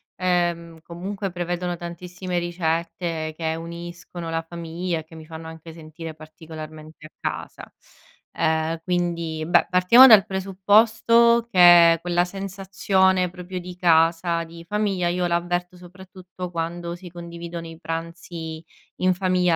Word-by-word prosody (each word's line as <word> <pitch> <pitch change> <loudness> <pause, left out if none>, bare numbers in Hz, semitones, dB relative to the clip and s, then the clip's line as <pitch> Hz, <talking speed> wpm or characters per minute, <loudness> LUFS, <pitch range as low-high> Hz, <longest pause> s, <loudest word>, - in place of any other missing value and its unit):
ehm, 175 -2 -1
comunque 190 +4 -5
prevedono 175 0 -3
tantissime 175 +1 -5
ricette 165 -1 -2
che 160 -1 -1
uniscono 170 0 -8
la 165 0 -1
famiglia 170 +1 -4
e - - -8
che 160 - -20
mi 160 -1 -11
fanno 160 0 -9
anche 160 0 -10
sentire 160 0 -9
particolarmente 155 0 -11
a - - -11
casa. - - -6 0.7
Ehm, 160 +1 0
quindi, 170 -3 -2
beh, 175 - +4
partiamo 190 +8 +8
dal 215 -5 +8
presupposto 220 +4 +3
che 175 -4 +7
quella 175 0 +1
sensazione 190 -1 0
proprio 180 +1 -7
di 180 0 -9
casa, 165 0 +3
di 165 0 -12
famiglia, 200 -3 0
io 180 +1 0
l'avverto 175 +1 -2
soprattutto 180 0 -10
quando 170 +1 -4
si 180 0 -11
condividono 170 0 -8
i 165 0 -11
pranzi 165 -1 -6 0.4
in 185 0 +2
famiglia 180 -2 +1
175 Hz, 130 wpm, -23 LUFS, 165-185 Hz, 0.7 s, partiamo